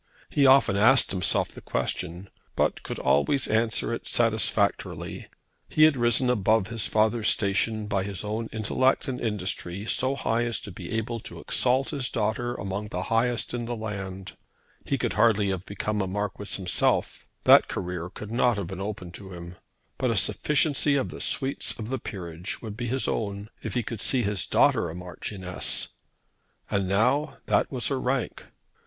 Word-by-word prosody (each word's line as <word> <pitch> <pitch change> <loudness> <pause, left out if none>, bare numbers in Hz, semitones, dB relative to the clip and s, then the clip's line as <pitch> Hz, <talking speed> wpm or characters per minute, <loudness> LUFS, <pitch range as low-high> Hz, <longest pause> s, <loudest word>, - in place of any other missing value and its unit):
He 140 -2 +4
often 130 -6 +5
asked 120 +6 +6
himself 90 -3 +1
the - - -11
question, 90 +4 -3 0.2
but - - 0
could - - -6
always 130 - +2
answer 110 +1 +1
it - - -5
satisfactorily. 110 -3 +1 0.4
He 155 - +3
had 155 -2 +6
risen 120 +1 +3
above 110 -3 +2
his 115 -3 0
father's 110 +1 +2
station 105 +2 +1
by 100 -2 0
his 100 -2 -3
own 110 +2 -3
intellect 110 +5 +1
and 125 -2 -4
industry 100 -3 -3
so 130 +4 +1
high 120 -3 0
as 115 -1 -1
to 100 - -8
be - - -8
able 115 +1 -2
to - - -10
exalt 130 +2 +1
his 135 -3 -3
daughter 120 +2 -1
among 100 +1 -4
the 90 -2 -4
highest 120 +1 +1
in 120 -1 -3
the 120 +1 -3
land. 95 -4 -6 0.5
He 140 - +1
could - - -1
hardly 105 -2 +3
have 95 -1 -4
become 105 +1 -2
a 95 - -1
Marquis 105 +1 -3
himself. 90 -2 0 0.2
That - - +7
career 90 -1 -4
could 105 +2 -9
not 120 -1 +2
have 100 - -2
been 95 +2 -7
open 100 -3 -5
to 95 +1 -10
him; 85 0 -9 0.4
but - - +1
a - - 0
sufficiency 145 -1 +2
of 135 - 0
the - - -8
sweets 135 -1 +1
of 110 -1 -6
the 130 0 -2
peerage 85 -2 -6
would 110 -3 -7
be 120 +1 -4
his 130 +3 0
own 100 0 -3
if - - -5
he 120 - +1
could 110 0 -5
see 130 -3 +3
his 100 -3 -1
daughter - - +3
a 80 - -7
Marchioness. 90 +1 -3 0.8
And 100 -2 0
now 125 +10 +1
that - - +1
was 125 -3 -1
her 135 -2 -1
rank. 130 -1 -2
110 Hz, 175 wpm, -26 LUFS, 100-120 Hz, 0.8 s, That